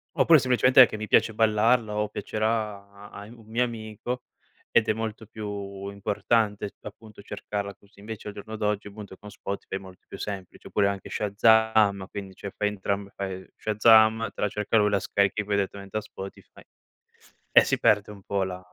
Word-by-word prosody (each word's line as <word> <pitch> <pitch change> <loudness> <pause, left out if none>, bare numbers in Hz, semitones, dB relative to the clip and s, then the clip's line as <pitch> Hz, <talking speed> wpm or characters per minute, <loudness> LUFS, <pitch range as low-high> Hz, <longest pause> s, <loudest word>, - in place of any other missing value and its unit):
Oppure, 165 -2 +6
semplicemente, 130 0 +6
che - - -6
mi 110 0 -5
piace 115 - +3
ballarla 110 +1 +2
o 105 0 0
piacerà 105 -2 -3
a 100 - -9
in 110 - -13
un 115 - -17
mio 115 +3 +1
amico 120 +1 -5 0.5
ed - - +5
è 110 - +4
molto 110 0 -5
più 100 -2 -6
importante 105 +1 -1
appunto 105 0 -12
cercarla 100 0 -5
così. 100 0 -24
Invece 105 0 -7
al - - -8
giorno 110 +2 -8
d'oggi, 105 -1 -1
appunto, 100 -1 -10
con 105 - -12
Spotify 100 -1 -6
è - - -9
molto 95 -1 -14
più 100 - -9
semplice, 100 -3 -7
oppure 100 -1 +2
anche 100 -1 -4
Shazam 105 -1 +3
quindi 100 -2 -7
cioè 100 - -7
fai 105 - 0
entrambe. 100 0 -3
Fai 95 -1 -5
Shazam 110 +1 +4
te - - -8
la 105 - +3
cerca 105 +2 0
lui; 105 -1 +4
la 100 -1 +2
scarichi 100 +2 0
poi 100 0 -1
direttamente 100 +1 -3
a - - -1
Spotify, 95 -1 -11 0.9
e - - +8
si - - 0
perde 105 0 +3
un 100 -2 -13
po' 100 -1 -1
la 90 -1 -4
105 Hz, 185 wpm, -26 LUFS, 100-110 Hz, 0.9 s, e